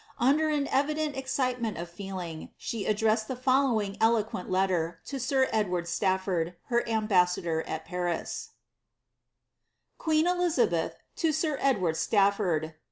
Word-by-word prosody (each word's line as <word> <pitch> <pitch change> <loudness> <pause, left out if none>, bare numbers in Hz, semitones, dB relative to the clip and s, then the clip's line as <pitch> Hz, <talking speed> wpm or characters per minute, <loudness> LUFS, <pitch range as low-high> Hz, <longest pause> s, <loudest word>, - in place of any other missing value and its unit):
Under 295 +5 +3
an 295 -2 +1
cvideDt 300 +2 0
excitement 255 -4 -1
of 170 +1 -4
feeling, 175 -3 -6
she 220 -4 -4
addressed 215 +1 +2
the 260 - -3
following 250 -6 +1
eloquent 220 -4 +1
let 185 +1 +3
ter 165 -2 -1
to 275 - -5
sir 260 +1 +2
Edward 180 -5 0
Staflbrd, 185 -2 0
her 235 -1 +1
ambassador 180 -7 +2
at 160 - -4
Paris: 175 -1 -3 0.7
— - - -52
QuiiH 315 0 +2
Elizabsth 355 -1 +1 0.2
to 325 -2 +2
Sib 310 -2 -1
Eowabd 190 -12 +2
Statfobd. 195 -6 +2
220 Hz, 130 wpm, -28 LUFS, 180-270 Hz, 0.7 s, Under